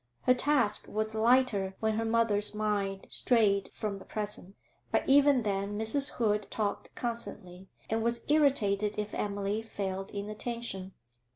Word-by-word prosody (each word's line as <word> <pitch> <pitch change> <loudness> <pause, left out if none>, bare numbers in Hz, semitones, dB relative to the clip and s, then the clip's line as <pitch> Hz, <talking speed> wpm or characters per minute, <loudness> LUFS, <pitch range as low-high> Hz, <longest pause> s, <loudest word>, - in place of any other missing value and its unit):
Her 255 - +5
task 250 -5 +2
was 215 +1 -2
lighter 220 -4 +2
when 220 0 0
her 225 +1 -1
mother's 225 -2 +3
mind 200 -2 -2
strayed 205 -5 +2
from 205 -2 -4
the - - -12
present; 205 -2 -4 0.4
but - - 0
even 280 -2 +5
then 200 0 -2
Mrs. 225 +6 +4
Hood 210 -3 0
talked 210 -2 -3
constantly, 190 -6 -5 0.2
and 225 +1 -1
was 235 +1 -1
irritated 215 -9 +2
if 210 0 -4
Emily 205 +1 -2
failed 195 -3 -5
in 200 0 -5
attention. 215 -3 -5
215 Hz, 145 wpm, -30 LUFS, 200-235 Hz, 0.4 s, Her